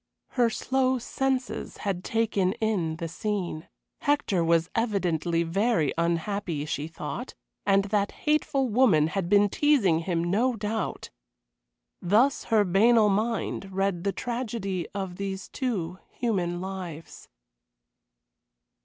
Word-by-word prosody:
Her 240 Hz, -3 st, +2 dB
slow 260 Hz, +2 st, +1 dB
senses 260 Hz, +1 st, -2 dB
had 185 Hz, -3 st, -1 dB
taken 210 Hz, -4 st, +1 dB
in 200 Hz, -8 st, -1 dB
the 165 Hz, +1 st, -4 dB
scene. 180 Hz, -2 st, -3 dB, 0.3 s
Hector 260 Hz, -11 st, +1 dB
was 165 Hz, 0 st, +3 dB
evidently 175 Hz, -7 st, 0 dB
very 185 Hz, -, +1 dB
unhappy, 170 Hz, -1 st, -1 dB
she 150 Hz, 0 st, -3 dB
thought, 165 Hz, -, -6 dB, 0.3 s
and 195 Hz, 0 st, +4 dB
that 205 Hz, 0 st, 0 dB
hateful 300 Hz, -3 st, +2 dB
woman 210 Hz, -10 st, +4 dB
had 185 Hz, -1 st, -2 dB
been 205 Hz, 0 st, +5 dB
teasing 210 Hz, -, +3 dB
him, 170 Hz, 0 st, -1 dB
no 225 Hz, +9 st, +1 dB
doubt. 215 Hz, 0 st, -3 dB, 0.9 s
Thus 220 Hz, +10 st, +3 dB
her 220 Hz, -2 st, +4 dB
banal 210 Hz, +4 st, +4 dB
mind 210 Hz, -1 st, -1 dB
read 190 Hz, -2 st, -1 dB
the 200 Hz, -, +1 dB
tragedy 215 Hz, -7 st, -3 dB
of 190 Hz, -3 st, -4 dB
these 195 Hz, -1 st, -4 dB
two 190 Hz, -, -3 dB
human 180 Hz, -7 st, -1 dB
lives. 185 Hz, -4 st, -7 dB
195 Hz, 120 wpm, -27 LUFS, 175-230 Hz, 0.9 s, been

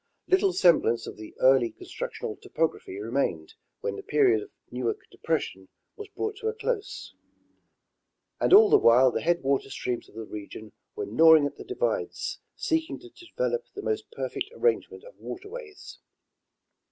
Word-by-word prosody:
Little 380 Hz, +1 st, +3 dB
semblance 165 Hz, -, +3 dB
of -, -, -7 dB
the 110 Hz, 0 st, -11 dB
early 130 Hz, -2 st, +5 dB
constructional 450 Hz, +3 st, -6 dB
topography 165 Hz, -, -3 dB
remained 105 Hz, -, -2 dB, 0.3 s
when 100 Hz, -, -2 dB
the -, -, -6 dB
period 130 Hz, -7 st, +3 dB
of -, -, -10 dB, 0.2 s
Newark 125 Hz, -1 st, -1 dB
depression 95 Hz, 0 st, -3 dB, 0.3 s
was 420 Hz, -, -8 dB
brought 425 Hz, +1 st, -4 dB
to 440 Hz, 0 st, -4 dB
a 445 Hz, -, -1 dB
close; 445 Hz, -1 st, -4 dB, 1.3 s
and -, -, +1 dB
all 415 Hz, +2 st, +8 dB
the -, -, +7 dB
while 125 Hz, +2 st, +6 dB
the -, -, -2 dB
headwater 140 Hz, -5 st, +1 dB
streams 125 Hz, -2 st, -4 dB
of -, -, -21 dB
the 110 Hz, 0 st, -6 dB
region 105 Hz, +1 st, -9 dB, 0.2 s
were 425 Hz, -, -3 dB
gnawing 160 Hz, -, +6 dB
at 145 Hz, -, -4 dB
the -, -, -8 dB
divides^ 485 Hz, +6 st, -2 dB, 0.2 s
seeking 320 Hz, +1 st, -1 dB
to 360 Hz, -, -14 dB
develop 475 Hz, +7 st, -3 dB
the 405 Hz, -, -6 dB
most 430 Hz, -2 st, -2 dB
perfect 460 Hz, -, -4 dB
arrangement 435 Hz, -3 st, 0 dB
of -, -, -14 dB
waterways. 410 Hz, +2 st, -9 dB
320 Hz, 150 wpm, -27 LUFS, -, 1.3 s, all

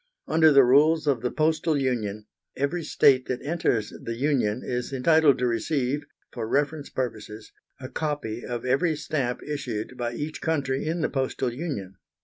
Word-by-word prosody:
Under 160 Hz, -1 st, +5 dB
the 140 Hz, -1 st, +7 dB
rules 150 Hz, +6 st, +4 dB
of 135 Hz, -6 st, +1 dB
the 125 Hz, -, 0 dB
Postal 155 Hz, +1 st, +1 dB
Union, 110 Hz, -6 st, -2 dB, 0.3 s
every 150 Hz, +5 st, -1 dB
state 130 Hz, -3 st, +4 dB
that 125 Hz, -, -3 dB
enters 140 Hz, -9 st, 0 dB
the 115 Hz, -, -4 dB
Union 125 Hz, -4 st, 0 dB
is 125 Hz, +1 st, -3 dB
entitled 145 Hz, +1 st, +4 dB
to 125 Hz, -, 0 dB
receive, 130 Hz, +4 st, 0 dB, 0.3 s
for 115 Hz, -3 st, -4 dB
reference 145 Hz, +3 st, -1 dB
purposes, 110 Hz, -3 st, -5 dB, 0.3 s
a 130 Hz, -, -6 dB
copy 145 Hz, -7 st, -3 dB
of 120 Hz, -1 st, -5 dB
every 140 Hz, +6 st, +2 dB
stamp 140 Hz, -5 st, -2 dB
issued 130 Hz, -6 st, -4 dB
by 120 Hz, -1 st, -2 dB
each 150 Hz, +3 st, -5 dB
country 140 Hz, -3 st, -1 dB
in 165 Hz, +1 st, -1 dB
the -, -, +1 dB
Postal 130 Hz, -2 st, -1 dB
Union. 120 Hz, -, -5 dB
135 Hz, 160 wpm, -26 LUFS, 120-150 Hz, 0.3 s, the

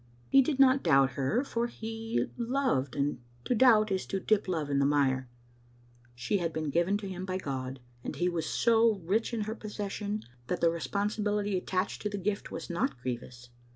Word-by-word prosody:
He 275 Hz, -, +7 dB
did 275 Hz, +1 st, -1 dB
not 270 Hz, 0 st, +6 dB
doubt 135 Hz, 0 st, +4 dB
her, 140 Hz, -, 0 dB
for 235 Hz, -4 st, -1 dB
he 225 Hz, 0 st, -3 dB
loved, 240 Hz, -, 0 dB
and 140 Hz, -3 st, -1 dB, 0.2 s
to -, -, +1 dB
doubt 215 Hz, -3 st, +5 dB
is 190 Hz, -1 st, -1 dB
to 195 Hz, -, -2 dB
dip 210 Hz, +1 st, +1 dB
love 160 Hz, -5 st, -1 dB
in 140 Hz, -, +2 dB
the 140 Hz, -, +3 dB
mire. 130 Hz, -3 st, +1 dB, 0.9 s
She 155 Hz, +12 st, 0 dB
had 165 Hz, -2 st, -1 dB
been 155 Hz, -2 st, -3 dB
given 175 Hz, +6 st, +2 dB
to 205 Hz, -1 st, -6 dB
him 185 Hz, -1 st, -5 dB
by 185 Hz, 0 st, -2 dB
God, 130 Hz, -5 st, -4 dB, 0.2 s
and -, -, -4 dB
he 175 Hz, -, 0 dB
was 170 Hz, -3 st, -1 dB
so 230 Hz, -1 st, +3 dB
rich 215 Hz, +8 st, +1 dB
in 230 Hz, -2 st, -2 dB
her 215 Hz, +1 st, -2 dB
possession 210 Hz, -1 st, -4 dB, 0.2 s
that 180 Hz, -, -1 dB
the 170 Hz, -, +4 dB
responsibility 205 Hz, +5 st, -1 dB
attached 185 Hz, +1 st, -2 dB
to 210 Hz, -, -1 dB
the 205 Hz, -, -4 dB
gift 200 Hz, +1 st, -2 dB
was -, -, -6 dB
not 170 Hz, -7 st, -1 dB
grievous. 125 Hz, 0 st, -6 dB
195 Hz, 190 wpm, -30 LUFS, 145-220 Hz, 0.9 s, He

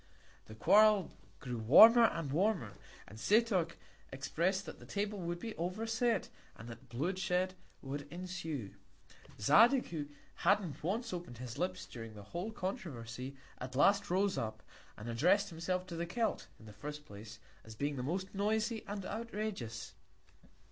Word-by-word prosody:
The 110 Hz, -, -10 dB
Quarrel 205 Hz, -, +5 dB, 0.3 s
grew 125 Hz, -4 st, -4 dB
warmer 225 Hz, -, +9 dB
and 165 Hz, -9 st, -1 dB
warmer, 170 Hz, -, +1 dB, 0.3 s
and 105 Hz, +4 st, -11 dB
Setoc 200 Hz, -, +3 dB, 0.4 s
expected 170 Hz, +8 st, -1 dB
that -, -, -9 dB
the -, -, -12 dB
Table 205 Hz, 0 st, -2 dB
would 175 Hz, -1 st, -3 dB
be 225 Hz, +5 st, -6 dB
overset, 225 Hz, +7 st, 0 dB, 0.3 s
and 115 Hz, -, -11 dB
that 120 Hz, +2 st, -11 dB
Blood 160 Hz, +11 st, -2 dB
shed 185 Hz, 0 st, 0 dB, 0.3 s
would 145 Hz, +1 st, -6 dB
ensue. 170 Hz, -, -5 dB, 0.7 s
Zadig, 230 Hz, -, +5 dB
who 150 Hz, -4 st, -4 dB, 0.3 s
hadn't 190 Hz, -4 st, +1 dB
once 220 Hz, +6 st, -1 dB
open'd 170 Hz, -9 st, -6 dB
his 125 Hz, -1 st, -7 dB
Lips 185 Hz, +1 st, -2 dB
during 115 Hz, -2 st, -9 dB
the 105 Hz, -, -10 dB
whole 175 Hz, -, -5 dB
Controversy, 135 Hz, -, -5 dB, 0.2 s
at 130 Hz, +1 st, -6 dB
last 200 Hz, +8 st, +4 dB
rose 190 Hz, +2 st, +2 dB
up, 110 Hz, -1 st, -4 dB, 0.3 s
and 105 Hz, -, -8 dB
address'd 165 Hz, -, +3 dB
himself 180 Hz, +3 st, -2 dB
to 175 Hz, -, -7 dB
the 170 Hz, +1 st, -3 dB
Celt, 225 Hz, +5 st, -1 dB
in 110 Hz, -, -15 dB
the 105 Hz, -, -11 dB
first 150 Hz, +6 st, -7 dB
Place, 105 Hz, 0 st, -10 dB, 0.3 s
as 110 Hz, 0 st, -11 dB
being 145 Hz, +5 st, -1 dB
the 130 Hz, -, -3 dB
most 185 Hz, +8 st, -3 dB
noisy 215 Hz, +3 st, 0 dB
and 200 Hz, -2 st, -5 dB
outrageous. 205 Hz, -, -4 dB
175 Hz, 155 wpm, -34 LUFS, 125-200 Hz, 0.7 s, warmer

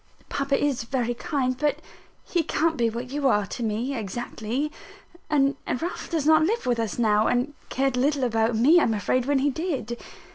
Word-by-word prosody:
Papa 275 Hz, 0 st, 0 dB
is 285 Hz, -4 st, 0 dB
very 240 Hz, 0 st, -1 dB
kind; 255 Hz, 0 st, -1 dB
but 290 Hz, +2 st, 0 dB, 0.4 s
he 345 Hz, -, 0 dB
can't 320 Hz, +1 st, 0 dB
be 235 Hz, -4 st, +2 dB
what 240 Hz, +3 st, -6 dB
you 285 Hz, -1 st, 0 dB
are 210 Hz, -5 st, +3 dB
to 205 Hz, -, -7 dB
me 230 Hz, +4 st, -1 dB
exactly; 235 Hz, +5 st, -3 dB, 0.6 s
and 275 Hz, -2 st, +2 dB
Ralph 335 Hz, +8 st, -3 dB
does 320 Hz, -4 st, -1 dB
not 315 Hz, 0 st, +6 dB
live 435 Hz, +9 st, 0 dB
with 245 Hz, -2 st, +1 dB
us 225 Hz, -3 st, -2 dB
now, 215 Hz, -2 st, +3 dB
and 250 Hz, +4 st, 0 dB, 0.2 s
cared 270 Hz, -1 st, 0 dB
little 280 Hz, +1 st, +1 dB
about 225 Hz, -1 st, +1 dB
me, 285 Hz, +10 st, +6 dB
I -, -, +3 dB
am 225 Hz, -, +1 dB
afraid, 250 Hz, +5 st, 0 dB
when 285 Hz, -1 st, +3 dB
he 280 Hz, +2 st, +2 dB
did. 265 Hz, -7 st, -3 dB
255 Hz, 190 wpm, -25 LUFS, 235-290 Hz, 0.6 s, not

